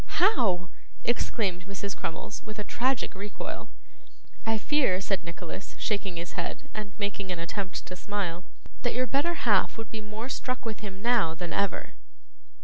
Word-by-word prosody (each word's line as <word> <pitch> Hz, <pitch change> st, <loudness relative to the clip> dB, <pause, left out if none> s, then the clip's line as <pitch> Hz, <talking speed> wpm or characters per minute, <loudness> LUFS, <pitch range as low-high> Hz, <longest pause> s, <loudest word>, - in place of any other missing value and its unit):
'How!' 195 Hz, -, +4 dB, 0.3 s
exclaimed 195 Hz, -6 st, +1 dB
Mrs. 200 Hz, 0 st, -2 dB
Crummles, 165 Hz, +5 st, -3 dB
with 215 Hz, 0 st, -7 dB
a 210 Hz, -, -1 dB
tragic 255 Hz, +4 st, +2 dB
recoil. 200 Hz, +2 st, -5 dB, 0.8 s
'I 225 Hz, 0 st, +4 dB
fear,' 240 Hz, -5 st, +4 dB
said 195 Hz, -1 st, +1 dB
Nicholas, 170 Hz, +2 st, -6 dB
shaking 195 Hz, -4 st, 0 dB
his 170 Hz, +1 st, -3 dB
head, 275 Hz, -, -3 dB
and 210 Hz, -2 st, -4 dB
making 200 Hz, -2 st, -1 dB
an 180 Hz, -, -1 dB
attempt 185 Hz, +3 st, -2 dB
to 180 Hz, -, -5 dB
smile, 185 Hz, -3 st, -1 dB, 0.4 s
'that 245 Hz, -, +1 dB
your 255 Hz, +1 st, +4 dB
better 290 Hz, +7 st, +2 dB
half 205 Hz, -2 st, +5 dB
would 225 Hz, -, -5 dB
be 220 Hz, -, -3 dB
more 210 Hz, +3 st, -4 dB
struck 255 Hz, -2 st, -2 dB
with 220 Hz, -2 st, -2 dB
him 195 Hz, -1 st, -6 dB
now 230 Hz, -9 st, +4 dB
than 175 Hz, 0 st, -3 dB
ever. 200 Hz, -, +1 dB
205 Hz, 160 wpm, -30 LUFS, 185-230 Hz, 0.8 s, half